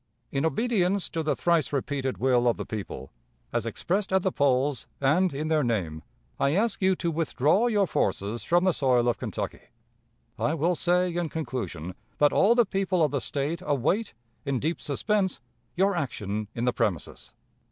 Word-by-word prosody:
"In 140 +4 +1
obedience 195 - +1
to 165 - -1
the 155 -1 0
thrice 170 -5 +1
repeated 135 -1 -2
will 125 -2 +2
of 120 - +2
the - - -4
people, 100 -10 -6 0.4
as 115 -1 0
expressed 190 - -1
at 190 -1 +3
the 190 - +1
polls, 135 -2 +1
and 165 +7 +3
in 150 +3 -3
their 155 -1 +2
name, 90 -10 -1 0.4
I 140 +3 +2
ask 215 +1 +1
you 190 0 +3
to 170 -1 -2
withdraw 160 - +2
your 210 -4 +3
forces 105 - -1
from 175 +1 +3
the 185 - +4
soil 125 -5 +2
of 120 - +1
Kentucky. - - -4 0.8
"I 155 - +1
will 165 +3 +1
say, 180 +1 +1
in 175 -2 -1
conclusion, 100 - -4 0.2
that 145 0 +4
all 220 +5 +5
the 240 -1 +5
people 190 -3 0
of 150 - +2
the 140 -2 -1
State 150 +7 -2
await, 150 - 0 0.3
in 140 -3 -1
deep 160 +6 -2
suspense, 190 +6 0 0.4
your 195 +2 +2
action 110 - -3
in 120 - -1
the 125 - +2
premises. 105 -9 -2
150 Hz, 175 wpm, -27 LUFS, 125-180 Hz, 0.8 s, all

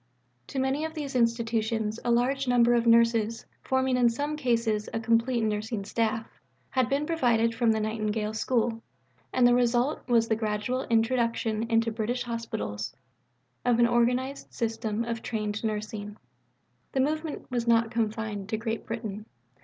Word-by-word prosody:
To - - -7
many 265 +3 0
of 320 0 -4
these 285 -4 -5
Institutions 230 -2 0
a 240 - -1
large 255 +3 +2
number 240 -1 +4
of 235 -1 +2
nurses, 230 -1 +3 0.2
forming 260 -1 +1
in 245 -1 +5
some 290 +6 -2
cases 230 -6 0
a - - 0
complete 230 +1 +2
Nursing 215 -1 -2
staff, 225 +1 -1 0.4
had 255 -2 +1
been 280 +2 +1
provided 240 -8 +2
from 230 -1 +2
the 220 - +1
Nightingale 215 0 -1
School, 230 0 0 0.5
and 255 -1 +3
the 245 - +6
result 245 +3 +2
was 230 -2 +3
the 220 - +2
gradual 220 +4 -2
introduction 230 -1 +1
into 230 0 +2
British 235 +3 -2
Hospitals 110 - -4 0.7
of 245 -2 +3
an 240 - +5
organized 245 +3 0
system 225 -1 -2
of 230 -1 -3
trained 215 -2 -3
nursing. 210 -1 -4 0.8
The 270 - 0
movement 310 +1 -2
was 240 -1 -1
not 230 -1 +3
confined 220 -3 -2
to 220 - -1
Great 225 0 -4
Britain. 215 -2 -5
230 Hz, 155 wpm, -28 LUFS, 220-245 Hz, 0.8 s, the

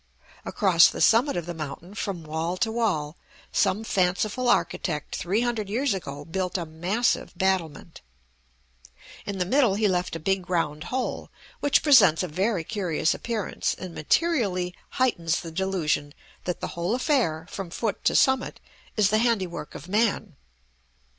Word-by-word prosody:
Across 180 -5 +5
the - - -7
summit 240 +3 +4
of 175 - -3
the 175 - -5
mountain, 160 +4 -7
from 195 -5 -4
wall 160 +3 -3
to 225 +2 0
wall, 185 -10 -1 0.4
some 210 +4 +1
fanciful 205 +5 0
architect 150 -9 0
three 195 +7 0
hundred 230 -4 -1
years 255 +4 +1
ago 145 -6 -6
built 180 +2 -2
a 170 - -3
massive 175 +7 -1
battlement; 175 -4 -1 1.3
in 200 -1 -3
the 180 - 0
middle 240 -1 +3
he 210 +1 +2
left 180 -3 -1
a - - -4
big 190 +2 -1
round 160 -3 -1
hole, 255 +6 -3 0.3
which 285 - +3
presents 200 - +6
a - - -2
very 185 +3 0
curious 180 -5 0
appearance, 225 -4 -2
and 185 -2 -8
materially 190 - +1 0.2
heightens 175 -11 +1
the 165 - -8
delusion 160 -5 -1 0.3
that 180 - -3
the - - -3
whole 175 +6 -1
affair, 245 - +1
from 195 -1 -6
foot 215 +5 -3
to - - +2
summit, 265 -1 +2 0.4
is 205 -2 +3
the 215 - +3
handiwork 200 -10 -1
of 150 - -9
man. 210 -3 0
190 Hz, 155 wpm, -26 LUFS, 165-220 Hz, 1.3 s, presents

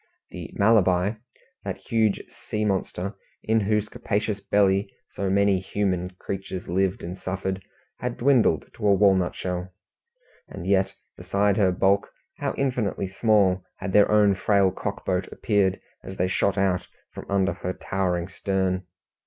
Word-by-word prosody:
The - - -7
Malabar, 100 0 +3 0.4
that - - -4
huge 110 -4 0
sea 105 0 -4
monster, 95 -1 -2 0.3
in 110 +1 +2
whose 105 0 +1
capacious 105 -1 -2
belly 100 -1 +2 0.2
so 100 -1 -2
many 100 0 +3
human 95 -2 -1
creatures 95 -1 -5
lived 95 +2 0
and 85 +2 -5
suffered, 95 0 -3 0.4
had 125 0 -3
dwindled 120 - +3
to 105 - -2
a 100 - +6
walnut 95 -2 +3
shell, 90 0 -4 0.8
and 95 -3 -8
yet 95 0 +2 0.2
beside 100 0 +1
her 95 -3 +4
bulk 95 +2 +2 0.3
how - - -2
infinitely 120 -8 -1
small 100 -2 +2
had 95 - -5
their 105 - +6
own 105 -1 +5
frail 100 0 +3
cockboat 95 -1 -3
appeared 100 -3 +1 0.2
as 95 - -8
they 90 - +1
shot 95 +1 +1
out 95 -2 +1 0.3
from - - -9
under 100 -1 +2
her 90 - -4
towering 90 -3 -1
stern! 95 -1 -1
95 Hz, 145 wpm, -25 LUFS, 95-105 Hz, 0.8 s, a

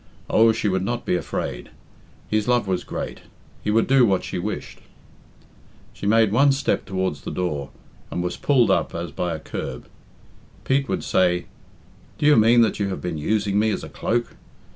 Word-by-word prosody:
Oh, 115 +1 +6
she 110 -1 -1
would 95 -2 +1
not 120 +4 -3
be - - +1
afraid. 70 -7 -4 0.6
His 110 -1 0
love 120 -3 +2
was 95 -2 -1
great. - - -5 0.4
He - - -2
would 110 +2 +3
do 135 -1 +5
what 100 -5 +2
she - - -4
wished. 105 +4 -5 1.1
She 100 - -5
made 110 -1 +4
one 135 +5 +4
step 135 - -1
towards 95 -4 -2
the - - -6
door, 75 -7 -3 0.4
and 90 - -3
was 90 - -2
pulled 130 -5 +3
up - - 0
as 85 -1 -4
by 85 +2 -2
a - - -6
curb. - - -6 0.8
Pete 135 +1 +1
would - - -1
say, 90 -1 +2 0.7
"Do - - -1
you 150 0 +7
mean 115 +2 +6
that 110 -2 +1
you 100 - 0
have 95 - -4
been 85 -3 -4
using 100 +4 +1
me 110 +1 +2
as 105 - -2
a - - -7
cloak? 120 +1 -2
105 Hz, 185 wpm, -23 LUFS, 90-115 Hz, 1.1 s, you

